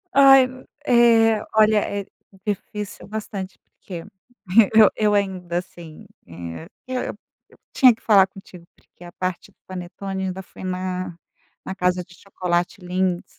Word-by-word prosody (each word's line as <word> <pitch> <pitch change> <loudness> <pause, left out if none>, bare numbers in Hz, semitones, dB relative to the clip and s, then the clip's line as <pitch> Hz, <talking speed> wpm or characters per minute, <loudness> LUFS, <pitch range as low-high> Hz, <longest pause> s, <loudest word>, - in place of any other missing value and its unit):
Ai 270 -1 +8 0.4
é 230 -3 +5
olha, 215 0 +5
é 200 -1 -3 0.4
difícil 210 -1 -5
bastante, 200 -2 -6
porque 175 -4 -11 0.7
e - - +8
eu 215 - +8
eu 210 -1 +2
ainda 185 -4 -1
assim, 170 -3 -9 0.2
eh, 85 -1 -8 0.2
eu 255 -1 -2 0.5
eu - - -22 0.2
tinha 255 -3 +6
que - - -28
falar 200 -4 +5
contigo, 190 -2 -14
porque - - -20
a 175 - -10
parte 185 +1 -4
do - - -37
panetone 190 +1 -6
ainda 190 0 -5
foi - - -13
na 185 -1 -4 0.5
na - - -4
casa 180 -1 0
de 180 - -19
chocolate 180 +1 -2
Lindt 180 0 -1
190 Hz, 145 wpm, -22 LUFS, 180-210 Hz, 0.7 s, Ai